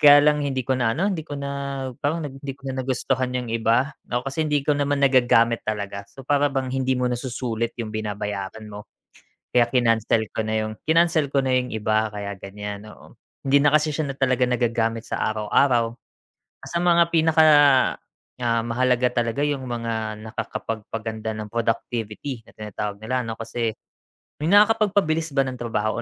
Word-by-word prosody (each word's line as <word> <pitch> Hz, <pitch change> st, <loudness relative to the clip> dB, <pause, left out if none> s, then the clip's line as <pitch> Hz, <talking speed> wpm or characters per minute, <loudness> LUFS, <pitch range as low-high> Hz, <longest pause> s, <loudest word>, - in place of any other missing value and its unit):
kaya 145 Hz, -1 st, +8 dB
lang 150 Hz, 0 st, +4 dB
hindi 135 Hz, -2 st, -1 dB
ko 135 Hz, -, 0 dB
na 120 Hz, -3 st, +1 dB
ano, 195 Hz, +4 st, +1 dB
hindi 170 Hz, -, -3 dB
ko 145 Hz, -2 st, -6 dB
na, 140 Hz, 0 st, -4 dB, 0.5 s
parang 155 Hz, +2 st, -1 dB
nag 145 Hz, -, -5 dB
hindi 140 Hz, -1 st, -5 dB
ko 140 Hz, -1 st, -8 dB
na 130 Hz, -, -3 dB
nagustuhan 130 Hz, 0 st, -1 dB
yung 120 Hz, -2 st, -4 dB
iba. 115 Hz, +5 st, +2 dB, 0.2 s
Oo, 120 Hz, -, -2 dB
kasi 155 Hz, +3 st, -2 dB
hindi 145 Hz, -2 st, +1 dB
ko 150 Hz, -, +3 dB
naman 145 Hz, 0 st, 0 dB
nagagamit 120 Hz, -4 st, +4 dB
talaga, 100 Hz, -2 st, -4 dB
so 135 Hz, -, -13 dB
para 145 Hz, +2 st, +2 dB
bang 135 Hz, -2 st, -2 dB
hindi 130 Hz, -1 st, 0 dB
mo 125 Hz, -, 0 dB
nasusulit 120 Hz, -2 st, -2 dB
yung 110 Hz, -3 st, -5 dB
binabayaran 105 Hz, -1 st, -4 dB
mo, 105 Hz, 0 st, -10 dB, 0.6 s
kaya 120 Hz, -1 st, +4 dB
kinancel 115 Hz, -3 st, +2 dB
ko 110 Hz, -1 st, -3 dB
na 110 Hz, -, -1 dB
yung 110 Hz, 0 st, -7 dB
kinancel 165 Hz, -1 st, +3 dB
ko 140 Hz, -, +4 dB
na 130 Hz, -, -1 dB
yung 125 Hz, -2 st, -3 dB
iba 110 Hz, 0 st, +1 dB
kaya 100 Hz, -1 st, -5 dB
ganyan, 105 Hz, +1 st, -7 dB
oo. -, -, -16 dB, 0.2 s
Hindi 140 Hz, +1 st, +4 dB
na 145 Hz, +1 st, +3 dB
kasi 155 Hz, 0 st, +3 dB
siya 150 Hz, +1 st, -2 dB
na 135 Hz, -, -4 dB
talaga 130 Hz, -2 st, +2 dB
nagagamit 115 Hz, -2 st, 0 dB
sa -, -, -1 dB
araw-araw. 115 Hz, +2 st, +2 dB, 0.8 s
Sa 170 Hz, 0 st, -2 dB
mga 170 Hz, -1 st, +5 dB
pinaka, 160 Hz, -1 st, +5 dB, 1.0 s
ah, 115 Hz, -1 st, +1 dB
mahalaga 125 Hz, +1 st, +1 dB
talaga 120 Hz, +5 st, 0 dB
yung 145 Hz, -2 st, -1 dB
mga 115 Hz, -2 st, -3 dB
nakakapagpaganda 110 Hz, 0 st, -5 dB
ng 105 Hz, -1 st, -6 dB
productivity 115 Hz, +2 st, -2 dB
na -, -, -19 dB
tinatawag 105 Hz, -1 st, -5 dB
nila 125 Hz, +5 st, -2 dB
ano, 115 Hz, -1 st, -5 dB
kasi 115 Hz, -1 st, -3 dB, 0.7 s
yung 160 Hz, -, +1 dB
nakakapagpabilis 205 Hz, -7 st, +3 dB
ba 135 Hz, -1 st, +2 dB
ng 130 Hz, -, -4 dB
trabaho 115 Hz, -1 st, -2 dB
125 Hz, 175 wpm, -23 LUFS, 110-140 Hz, 1.0 s, kaya